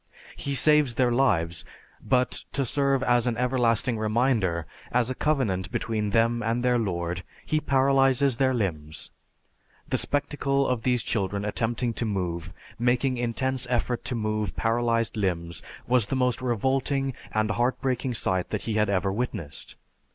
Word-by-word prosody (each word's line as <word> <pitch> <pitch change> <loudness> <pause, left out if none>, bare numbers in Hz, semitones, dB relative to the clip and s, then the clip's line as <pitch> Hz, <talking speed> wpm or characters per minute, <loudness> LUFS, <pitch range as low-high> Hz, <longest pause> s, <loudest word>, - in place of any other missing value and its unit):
He 140 -1 -3
saves 150 -2 +4
their 125 -1 +2
lives, 85 -10 +1 0.4
but 125 -1 0
to 140 -1 0
serve 135 +1 +1
as 120 0 +2
an 115 -2 0
everlasting 120 -2 +1
reminder, 110 - +1 0.3
as 125 0 +1
a - - 0
covenant 110 - 0
between 110 -2 -1
them 115 +2 +2
and 115 +2 -1
their 125 -1 +3
Lord, 85 -4 -2 0.2
He 155 - +1
paralyzes 135 -2 +3
their 130 0 +3
limbs. 80 -10 -3 0.8
The - - +1
spectacle 140 -1 +1
of 125 -3 0
these 125 -1 +1
children 100 -1 -2
attempting 115 +3 -1
to 115 - -2
move, 90 -5 -3 0.3
making 125 +2 +1
intense 125 +2 -1
effort 120 0 -1
to 125 - -1
move 110 -2 -2
paralyzed 115 0 0
limbs, 85 -5 -2 0.2
was 125 -4 +2
the 135 - -1
most 125 -1 +1
revolting 130 +3 0 0.2
and 110 0 0
heart 120 +4 0
breaking 130 -1 -1
sight 95 -3 -1
that 105 - -3
he 115 - -2
had 105 -1 +2
ever 95 0 +1
witnessed. 105 -9 -4
120 Hz, 150 wpm, -26 LUFS, 105-130 Hz, 0.8 s, saves